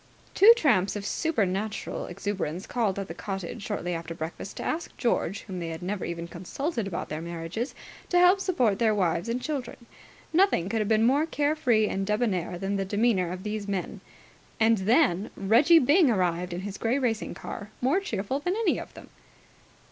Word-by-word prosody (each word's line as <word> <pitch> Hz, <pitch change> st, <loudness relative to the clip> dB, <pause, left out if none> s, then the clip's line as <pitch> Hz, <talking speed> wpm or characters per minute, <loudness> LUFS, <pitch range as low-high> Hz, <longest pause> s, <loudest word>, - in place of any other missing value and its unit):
Two 415 Hz, +4 st, +8 dB
tramps 215 Hz, -, +2 dB
of 205 Hz, -1 st, -5 dB
supernatural 215 Hz, -, -1 dB
exuberance 190 Hz, -3 st, -4 dB
called 220 Hz, -6 st, -1 dB
at 195 Hz, -1 st, -3 dB
the -, -, -6 dB
cottage 195 Hz, +3 st, -5 dB
shortly 195 Hz, -4 st, -3 dB
after 165 Hz, 0 st, -5 dB
breakfast 160 Hz, +4 st, -6 dB
to -, -, -4 dB
ask 330 Hz, +1 st, -3 dB
George, 200 Hz, -5 st, 0 dB
whom 185 Hz, -3 st, -7 dB
they 170 Hz, -, -4 dB
had 165 Hz, +1 st, -6 dB
never 195 Hz, +1 st, -3 dB
even 170 Hz, 0 st, -5 dB
consulted 225 Hz, -, -4 dB
about 180 Hz, -, -4 dB
their 155 Hz, +1 st, -4 dB
marriages, 170 Hz, -, -5 dB, 0.3 s
to 355 Hz, -, +2 dB
help 360 Hz, +2 st, +6 dB
support 250 Hz, -, +1 dB
their 220 Hz, -2 st, +3 dB
wives 175 Hz, 0 st, 0 dB
and 245 Hz, +2 st, -2 dB
children. 265 Hz, -5 st, -5 dB, 0.5 s
Nothing 335 Hz, -, +3 dB
could 225 Hz, 0 st, 0 dB
have 210 Hz, -, -1 dB
been 220 Hz, 0 st, +4 dB
more 285 Hz, +6 st, +3 dB
care 295 Hz, -1 st, 0 dB
free 235 Hz, -8 st, +2 dB
and 195 Hz, -, -2 dB
debonnaire 205 Hz, -5 st, 0 dB
than 195 Hz, +2 st, -2 dB
the 195 Hz, -, 0 dB
demeanour 200 Hz, -3 st, +1 dB
of 185 Hz, +1 st, -6 dB
these 210 Hz, -1 st, -4 dB
men. 195 Hz, -3 st, -3 dB, 0.6 s
And 225 Hz, -1 st, +4 dB
then 210 Hz, -, +2 dB
Reggie 235 Hz, -, +5 dB
Byng 310 Hz, +2 st, +5 dB
arrived 180 Hz, -4 st, 0 dB
in 175 Hz, +1 st, -4 dB
his 200 Hz, 0 st, -6 dB
grey 235 Hz, +4 st, +1 dB
racing 240 Hz, -5 st, -1 dB
car, 205 Hz, -2 st, -7 dB
more 270 Hz, +9 st, +2 dB
cheerful 265 Hz, -, -3 dB
than 355 Hz, +6 st, -1 dB
any 440 Hz, -4 st, +1 dB
of -, -, -10 dB
them. -, -, -12 dB
210 Hz, 185 wpm, -27 LUFS, 185-255 Hz, 0.6 s, Two